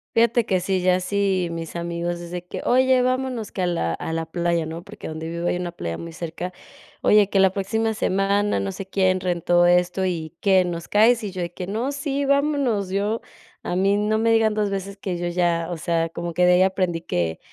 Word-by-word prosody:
Fíjate 235 0 +3
que 185 -1 +1
sí, 185 0 -1
ya 180 0 +4
así 190 -1 0
mis 165 0 -5
amigos, 170 0 -3
es 175 0 -9
de 180 -1 -5
que: - - -6
"Oye, 260 0 +4
vámonos 255 -3 -1
que 190 - -3
a 180 - +2
la 85 - -1
a - - -5
la 165 0 -2
playa", 170 0 -1
¿no? 165 +2 -6
Porque - - -10
donde 160 +1 -5
vivo 170 +1 -3
hay - - +1
una 175 -1 -3
playa 85 - -5
muy 170 - -7
cerca: 170 +2 -5 0.5
"Oye, 210 -1 +5
que 195 - +2
la 190 -1 +5
próxima 220 +3 -1
semana, 200 - +1
no 95 0 -3
sé 195 - -6
quién, 185 -1 +1
rentó 175 -1 +2
esto 180 +2 +3
y, 165 -4 -3
¿qué, 190 -2 +4
nos 170 -1 -5
caes?", 225 +2 +4
y 200 - -4
yo 185 - -7
de 170 0 -4
que: 180 - -5
"No, 230 +8 -2
sí, 280 -1 -2
vámonos", 280 -8 +1
yo 205 +4 -1 0.4
a 180 - -2
mí 195 +1 +3
no 210 +1 +1
me 225 +1 +3
digan 220 -1 +3
2 210 -1 0
veces 195 0 -4
que 185 -3 -4
yo 175 0 -2
ya, 170 -1 0
o 170 - -3
sea, 165 0 0
como 170 0 -5
que 180 +1 +3
de 180 - +6
ahí 180 - +4
aprendí 185 -3 0
que, 85 - -2
185 Hz, 230 wpm, -23 LUFS, 170-210 Hz, 0.5 s, de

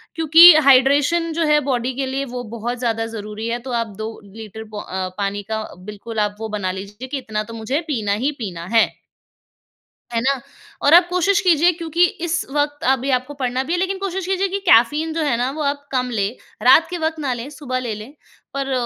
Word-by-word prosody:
क्योंकि 325 +2 +9
हाइड्रेशन 290 +6 +4
जो 330 0 0
है 300 0 +4
बॉडी 250 0 -1
के 270 0 -2
लिए 270 +1 -3
वो 245 -1 -6
बहुत 240 +3 -3
ज़्यादा 225 -2 -1
ज़रूरी 215 0 -6
है 235 +1 -2
तो - - -4
आप 230 - -4
2 220 0 -4 0.3
लीटर 220 0 -9
पो 210 - -6
अ, 185 -1 -4
पानी 200 0 -2
का 220 0 -1 0.2
बिल्कुल 210 +3 -7
आप 205 0 0
वो 220 - -4
बना 200 -3 -2
लीजिए 205 +6 -8
कि 280 - -4
इतना 215 -3 -4
तो 230 - -11
मुझे 255 +8 -2
पीना 215 -8 0
ही 295 - +2
पीना 175 -7 -6
है। 225 - +5 1.3
है 230 - +1
ना? 270 0 +1 0.4
और 285 +3 +5
आप 350 0 +7
कोशिश 365 +2 +2
कीजिए 355 -2 +4
क्योंकि 335 +1 +1 0.2
इस 345 +1 -1
वक़्त 290 0 -1
अभी 265 +1 0
आपको 255 +3 -1
पढ़ना 255 -1 -2
भी 325 - -4
है 355 - +1
लेकिन 380 +1 -1
कोशिश 385 -2 -3
कीजिए 385 +1 0
कि 395 +2 -2
कैफ़ीन 295 +5 +4
जो 325 - -1
है 280 -6 +1
ना 245 +2 -1
वो 305 +1 -4
आप 285 0 -2
कम 250 -1 0
लें। 210 +1 -2 0.3
रात 265 +7 +6
के 355 - -3
वक़्त 320 0 -2
ना 270 -3 -1
लें 240 +3 -6
सुबह 265 -3 -4
ले 235 -4 -3
लें 215 +7 -10 0.4
पर 275 -1 -3
260 Hz, 215 wpm, -20 LUFS, 225-315 Hz, 1.3 s, क्योंकि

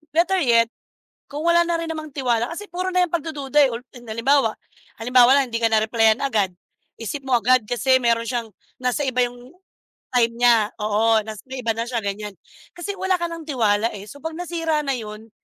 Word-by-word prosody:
Better 360 +3 +3
yet 230 -2 +4 0.6
kung 295 +1 -4
wala 340 0 +5
na 335 -1 -1
rin 335 - -4
namang 310 -2 -6
tiwala 240 -1 0
kasi 415 +4 -8
puro 365 +1 -3
na 365 0 +4
yang - - -22
pagdududa, 295 -3 0
eh, 260 - +2
ulti 245 +1 -10
halimbawa 230 +2 +2 0.5
halimbawa 250 +1 +5
lang 270 -2 +2
hindi 230 - -1
ka - - +6
na-replyan 220 +1 +3
agad 210 -8 +1 0.5
isip 270 +5 -5
mo 255 -2 +3
agad 250 +1 +3
kasi 260 +2 +3
meron 230 0 +2
siyang 235 -3 -3 0.3
nasa 250 +4 0
iba 250 -1 +2
'yong 245 +4 -11 0.6
time 230 -1 +3
niya 235 -2 +4
oo 220 +1 +3
nas 215 -2 -7
may 260 -1 -5
iba 225 - +1
na 230 +1 -2
siya 240 -2 -1
ganyan 200 0 -4 0.4
kasi 400 +3 -5
wala 380 -1 +1
ka 345 - -1
ng 330 -1 -7
tiwala, 225 -5 +2
eh, 195 - -8
so 285 - -12
pag 320 0 -4
nasira 330 -3 -1
na 275 - 0
'yon 220 -1 -8
245 Hz, 200 wpm, -22 LUFS, 225-305 Hz, 0.6 s, ka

